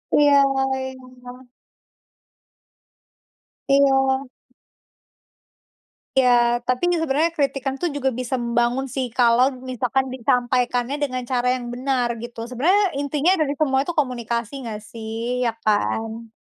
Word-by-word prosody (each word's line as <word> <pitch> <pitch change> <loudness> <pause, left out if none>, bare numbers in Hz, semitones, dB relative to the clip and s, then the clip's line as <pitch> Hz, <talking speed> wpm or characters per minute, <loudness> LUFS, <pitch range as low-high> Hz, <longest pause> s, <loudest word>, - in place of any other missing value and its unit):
Iya 290 -1 +5 0.4
iya. 255 -1 -9 2.2
Iya. 270 -1 +3 1.9
Iya, 240 -2 +4
tapi 250 0 0
kan 345 - +1
sebenarnya 305 +5 +2
kritikan 275 -3 -1
tuh 350 - +1
juga 270 -2 0
bisa 255 +1 -2
membangun 240 +2 +1
sih 260 -2 -1
kalau 245 +1 +5 0.2
misalkan 255 +1 0
disampaikannya 250 0 0
dengan 255 -3 -2
cara 250 -1 +1
yang 250 -1 -6
benar 255 0 0 0.2
gitu. 240 -1 -9
Sebenarnya 350 - +3 0.2
intinya 290 +4 +1
dari 290 -2 +1
semua 270 -2 +1
itu 345 - -3
komunikasi 235 -3 -2
nggak 215 -1 -6
sih, 230 +2 -4
iya - - +1
kan? 225 +2 -1
255 Hz, 115 wpm, -22 LUFS, 240-270 Hz, 2.2 s, Iya